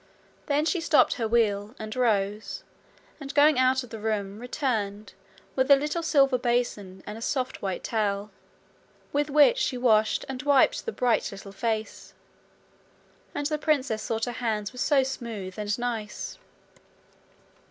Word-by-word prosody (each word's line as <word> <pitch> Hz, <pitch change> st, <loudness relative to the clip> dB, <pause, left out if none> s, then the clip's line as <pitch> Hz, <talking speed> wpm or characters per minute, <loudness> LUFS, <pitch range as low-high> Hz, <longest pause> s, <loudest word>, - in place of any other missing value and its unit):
Then 295 Hz, 0 st, +1 dB
she 350 Hz, +1 st, 0 dB
stopped 320 Hz, -2 st, +4 dB
her 230 Hz, -4 st, -2 dB
wheel, 215 Hz, -1 st, +1 dB
and 215 Hz, 0 st, -6 dB
rose, 210 Hz, -4 st, 0 dB, 0.6 s
and, 275 Hz, -2 st, -6 dB
going 295 Hz, -1 st, +5 dB
out 260 Hz, 0 st, +3 dB
of 250 Hz, -, -13 dB
the 225 Hz, -, -6 dB
room, 210 Hz, -2 st, -2 dB
returned 215 Hz, -, -3 dB, 0.4 s
with 260 Hz, +1 st, +1 dB
a 280 Hz, -, +10 dB
little 295 Hz, +4 st, -2 dB
silver 275 Hz, -5 st, +3 dB
basin 235 Hz, -6 st, -1 dB
and 210 Hz, +2 st, -7 dB
a -, -, -12 dB
soft 255 Hz, +2 st, -2 dB
white 190 Hz, -2 st, -3 dB
towel, 205 Hz, -2 st, -1 dB, 0.8 s
with 290 Hz, +1 st, +1 dB
which 300 Hz, -, +5 dB
she 260 Hz, -, 0 dB
washed 220 Hz, -3 st, +2 dB
and 265 Hz, -1 st, -5 dB
wiped 285 Hz, -, +3 dB
the -, -, 0 dB
bright 245 Hz, -, +1 dB
little 195 Hz, 0 st, -9 dB
face. 220 Hz, +2 st, -4 dB, 1.2 s
And 290 Hz, -, -2 dB
the 305 Hz, +1 st, -1 dB
princess 270 Hz, -8 st, 0 dB
thought 225 Hz, 0 st, -1 dB
her 245 Hz, -, -3 dB
hands 225 Hz, -2 st, -2 dB
were 250 Hz, -, -9 dB
so 275 Hz, 0 st, +3 dB
smooth 225 Hz, -7 st, -6 dB
and 210 Hz, 0 st, -1 dB
nice! 235 Hz, -, -4 dB
240 Hz, 155 wpm, -27 LUFS, 210-275 Hz, 1.2 s, a